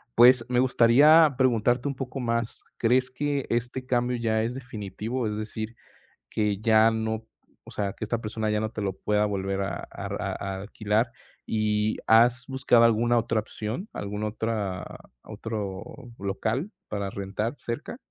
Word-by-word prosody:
Pues, 120 Hz, 0 st, +7 dB
me 125 Hz, 0 st, +2 dB
gustaría 140 Hz, +5 st, +6 dB
preguntarte 125 Hz, 0 st, +2 dB
un 140 Hz, -, -2 dB
poco 135 Hz, +1 st, -5 dB
más, 115 Hz, -2 st, -2 dB
¿crees 125 Hz, +2 st, +2 dB
que 140 Hz, +1 st, -2 dB
este 120 Hz, +2 st, -2 dB
cambio 125 Hz, -1 st, +1 dB
ya 110 Hz, -1 st, +1 dB
es 120 Hz, +2 st, -2 dB
definitivo, 115 Hz, 0 st, -4 dB
es 105 Hz, -, -2 dB
decir, 110 Hz, +1 st, -5 dB, 0.5 s
que 105 Hz, -2 st, 0 dB
ya 110 Hz, 0 st, +5 dB
no 110 Hz, 0 st, -2 dB, 0.4 s
o -, -, -12 dB
sea, 100 Hz, -2 st, -2 dB
que -, -, -7 dB
esta 115 Hz, +2 st, -1 dB
persona 110 Hz, -1 st, -3 dB
ya 105 Hz, 0 st, +1 dB
no 110 Hz, 0 st, -2 dB
te 110 Hz, -, -5 dB
lo 95 Hz, -2 st, -1 dB
pueda 105 Hz, +2 st, +1 dB
volver 100 Hz, -1 st, -2 dB
a 100 Hz, -, -3 dB
a -, -, -7 dB
r -, -, -4 dB
a -, -, -2 dB
a 95 Hz, -1 st, -3 dB
alquilar, 110 Hz, +3 st, 0 dB, 0.3 s
y 105 Hz, 0 st, 0 dB
has 120 Hz, +3 st, +5 dB
buscado 130 Hz, -3 st, +3 dB
alguna 120 Hz, +1 st, +3 dB
otra 115 Hz, -1 st, 0 dB
opción, 110 Hz, -, -5 dB
alguna 105 Hz, +1 st, -3 dB
otra 105 Hz, -5 st, -3 dB, 0.4 s
otro 100 Hz, -4 st, -5 dB, 0.4 s
local 110 Hz, -, -2 dB, 0.2 s
para 100 Hz, -2 st, -3 dB
rentar 100 Hz, +4 st, -3 dB
cerca? 130 Hz, -, -5 dB
115 Hz, 160 wpm, -26 LUFS, 105-125 Hz, 0.5 s, Pues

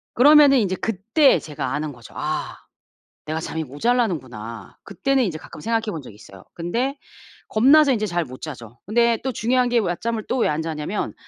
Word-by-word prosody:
그러면은 285 Hz, +1 st, +7 dB
인제 190 Hz, -4 st, 0 dB
그때 225 Hz, -, +2 dB
제가 150 Hz, -3 st, -5 dB
아는 150 Hz, +1 st, -2 dB
거죠. 120 Hz, -3 st, -15 dB
'아 -, -, -3 dB, 0.7 s
내가 155 Hz, +1 st, -3 dB
잠이 160 Hz, 0 st, -4 dB
모자라는구나.' 135 Hz, -, -2 dB
그때는 275 Hz, -1 st, 0 dB
인제 170 Hz, -6 st, -3 dB
가끔 155 Hz, -, -12 dB
생각해 225 Hz, +2 st, 0 dB
본 160 Hz, -, -5 dB
적이 110 Hz, -, -12 dB
있어요. 95 Hz, -2 st, -15 dB
근데 240 Hz, +12 st, -2 dB, 0.5 s
겁나서 275 Hz, +6 st, +5 dB
인제 215 Hz, -3 st, -1 dB
잘 175 Hz, -2 st, -1 dB
못 130 Hz, -1 st, -11 dB
자죠. 120 Hz, -6 st, -9 dB
근데 235 Hz, +2 st, +3 dB
또 265 Hz, -, -1 dB
중요한 250 Hz, +3 st, +1 dB
게 240 Hz, -1 st, +3 dB
낮잠을 215 Hz, +4 st, -2 dB
또 255 Hz, -, 0 dB
왜 -, -, +2 dB
안 150 Hz, +1 st, -1 dB
자냐면 160 Hz, +5 st, -3 dB
195 Hz, 360 characters per minute, -22 LUFS, 150-245 Hz, 0.7 s, 그러면은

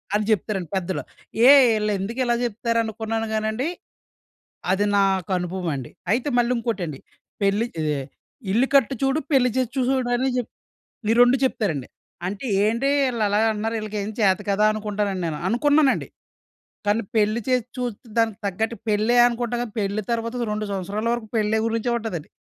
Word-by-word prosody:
అని 210 Hz, -, +2 dB
చెప్తారండి 195 Hz, -4 st, -1 dB
పెద్దలు. 185 Hz, 0 st, -2 dB, 0.5 s
ఏయ్! 275 Hz, -3 st, +8 dB
ఈళ్ళెందుకిలా 215 Hz, +4 st, 0 dB
చెప్తారనుకున్నాను 225 Hz, -1 st, -1 dB
గానండి, 220 Hz, +5 st, -1 dB, 1.1 s
అది 200 Hz, +2 st, +2 dB
నాకనుభవమండి. 180 Hz, -6 st, -1 dB, 0.2 s
అయితే 250 Hz, +5 st, 0 dB
మళ్ళీంకోటండి, 230 Hz, -, -1 dB, 0.4 s
పెళ్లి 200 Hz, +3 st, +2 dB, 0.2 s
ఇదే 150 Hz, -2 st, 0 dB, 0.5 s
ఇల్లు 240 Hz, +6 st, +3 dB
కట్టి 270 Hz, -2 st, +4 dB
చూడు, 270 Hz, +3 st, +2 dB
పెళ్లి 260 Hz, -2 st, +5 dB
చేసి 255 Hz, -3 st, 0 dB
చూసుడని 255 Hz, 0 st, +1 dB
జెప్ 245 Hz, -2 st, -2 dB, 0.6 s
ఈ -, -, +3 dB
2 245 Hz, +2 st, +5 dB
చెప్తారండి. 165 Hz, -, -1 dB, 0.4 s
అంటే, 200 Hz, +7 st, -4 dB, 0.2 s
ఏంటి 235 Hz, +5 st, +1 dB, 0.2 s
ఈళ్ళలాగ 215 Hz, -3 st, +1 dB
అంటున్నారు, 220 Hz, +2 st, -2 dB
ఈళ్ళకేం 215 Hz, -1 st, -4 dB
చేత 190 Hz, -3 st, +4 dB
కాదా, 200 Hz, +2 st, +2 dB
అనుకుంటానండి 210 Hz, -3 st, -2 dB
నేను. 155 Hz, -2 st, -3 dB
అనుకున్నానండి. 290 Hz, +5 st, +3 dB, 0.8 s
కానీ 210 Hz, +3 st, +2 dB
పెళ్లి 215 Hz, +2 st, +2 dB
చేసి 250 Hz, -2 st, +2 dB
చూస్తే 245 Hz, -1 st, -4 dB
దానికి 225 Hz, -3 st, +1 dB
తగ్గట్టు 220 Hz, +4 st, -2 dB
పెళ్ళే 215 Hz, +3 st, +2 dB
అనుకుంటాం 240 Hz, 0 st, -2 dB
గానీ, 235 Hz, -3 st, -6 dB
పెళ్లి 200 Hz, +1 st, -1 dB
తర్వాత 230 Hz, +1 st, -2 dB
2 215 Hz, 0 st, -2 dB
సంవత్సరాల 200 Hz, +3 st, -3 dB
వరకు 235 Hz, -2 st, -6 dB
పెళ్ళే 220 Hz, 0 st, +1 dB
గురించే 230 Hz, +1 st, -1 dB
ఉంటదండి. 195 Hz, -9 st, -5 dB
220 Hz, 135 wpm, -23 LUFS, 200-240 Hz, 1.1 s, ఏయ్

